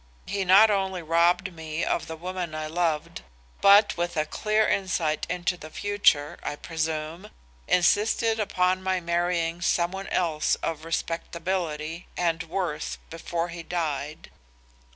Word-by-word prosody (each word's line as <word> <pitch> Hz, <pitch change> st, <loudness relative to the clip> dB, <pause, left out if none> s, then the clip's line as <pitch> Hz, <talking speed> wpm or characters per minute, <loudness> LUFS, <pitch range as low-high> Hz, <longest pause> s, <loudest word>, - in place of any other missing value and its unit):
He 200 Hz, -1 st, -2 dB
not 200 Hz, +4 st, +7 dB
only 190 Hz, -3 st, -1 dB
robbed 170 Hz, +3 st, +2 dB
me 160 Hz, 0 st, -4 dB
of 170 Hz, -, -1 dB
the 160 Hz, -, -5 dB
woman 175 Hz, -1 st, -5 dB
I 155 Hz, 0 st, -3 dB
loved, 160 Hz, -, -1 dB, 0.4 s
but 205 Hz, +1 st, +6 dB
with 175 Hz, 0 st, -2 dB
a 155 Hz, -, +2 dB
clear 215 Hz, +6 st, +1 dB
insight 170 Hz, -6 st, 0 dB
into 180 Hz, 0 st, -1 dB
the 155 Hz, -, -10 dB
future, 180 Hz, -6 st, +1 dB
I -, -, -3 dB
presume, 160 Hz, +4 st, -4 dB, 0.4 s
insisted 220 Hz, +5 st, +3 dB
upon 185 Hz, -2 st, +1 dB
my 190 Hz, 0 st, 0 dB
marrying 170 Hz, 0 st, -1 dB
some 175 Hz, 0 st, +1 dB
one 195 Hz, +1 st, -6 dB
else 160 Hz, -4 st, +1 dB
of 160 Hz, -1 st, -3 dB
respectability 165 Hz, -1 st, -3 dB
and 165 Hz, -2 st, +1 dB
worth 165 Hz, -2 st, -3 dB
before 165 Hz, +1 st, -3 dB
he 170 Hz, 0 st, -7 dB
died. 155 Hz, -3 st, -4 dB
170 Hz, 135 wpm, -26 LUFS, 160-185 Hz, 0.4 s, not